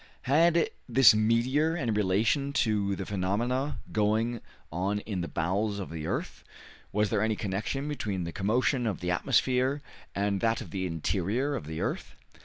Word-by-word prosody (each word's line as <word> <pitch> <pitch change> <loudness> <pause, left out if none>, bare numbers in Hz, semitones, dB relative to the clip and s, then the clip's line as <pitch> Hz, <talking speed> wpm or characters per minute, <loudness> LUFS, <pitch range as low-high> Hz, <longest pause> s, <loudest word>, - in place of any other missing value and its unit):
Had 165 +5 +3 0.2
this 125 -2 +7
meteor 125 +9 +2
any 120 -8 -1
relation 110 +8 +1
to 105 -6 +1
the 95 - -5
phenomena 115 +9 -1
going 110 +2 +1 0.3
on 95 +5 -1
in 100 -4 -4
the 85 - -3
bowels 100 +5 -1
of 100 -4 -6
the 80 -2 -5
earth? - - -4 0.5
Was 105 0 +1
there 105 -3 +1
any 110 0 +1
connection 105 +8 -3
between 105 -11 -3
the 85 - -4
commotion 120 - +1
of 105 - -2
the 90 0 -2
atmosphere 130 +6 +2 0.4
and 100 -1 0
that 115 0 +2
of - - -8
the 95 -2 -2
interior 100 - -1
of 100 - -4
the 80 0 -4
earth? - - -3
105 Hz, 165 wpm, -29 LUFS, 95-130 Hz, 0.5 s, this